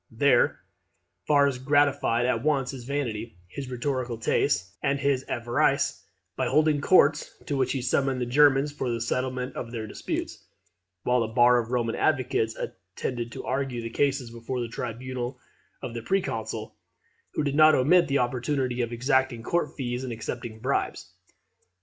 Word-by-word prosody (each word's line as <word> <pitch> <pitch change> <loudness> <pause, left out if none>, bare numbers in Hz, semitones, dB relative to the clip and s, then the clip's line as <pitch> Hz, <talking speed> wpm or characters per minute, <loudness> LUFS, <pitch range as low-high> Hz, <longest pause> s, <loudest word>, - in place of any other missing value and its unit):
There - - +3 0.7
Varus 140 -3 +3
gratified 140 -3 +2
at 120 -2 +1
once 140 -3 +1
his 130 -4 -8
vanity, 115 -6 -3
his 130 +8 -7
rhetorical 125 -1 -2
taste, 95 -3 0
and 140 - +1
his 135 -2 +1
avarice, 120 0 0 0.3
by - - 0
holding 155 -1 +3
courts, 150 -3 +4
to 145 - -2
which 130 -2 +1
he 130 -3 -2
summoned 135 +1 +1
the 125 - -1
Germans 140 +2 +4
for 135 -3 -3
the 115 -1 -1
settlement 125 +2 -2
of 120 - -4
all - - -12
their 115 -2 -4
disputes, 105 - -5 0.6
while 125 0 +2
a 115 - 0
bar 120 +2 +5
of 115 -1 -4
Roman 120 -2 0
advocates 130 -6 +1
attended 115 +7 -5
to - - -7
argue 130 -3 -2
the 115 - -5
cases 135 -2 0
before 120 +2 -5
the 120 - -2
tribunal 125 +2 -5 0.5
of 125 -3 -5
the 115 - -4
Proconsul; 180 - -2 0.6
who - - +1
did 140 -1 -1
not 155 +1 +7
omit 170 +7 +4
the 140 - +1
opportunity 125 0 0
of 120 -1 -2
exacting 130 -1 +1
court 175 +8 -1
fees 125 -2 -3
and 130 - -4
accepting 115 0 -5
bribes. 130 +5 -2
125 Hz, 160 wpm, -26 LUFS, 120-140 Hz, 0.7 s, not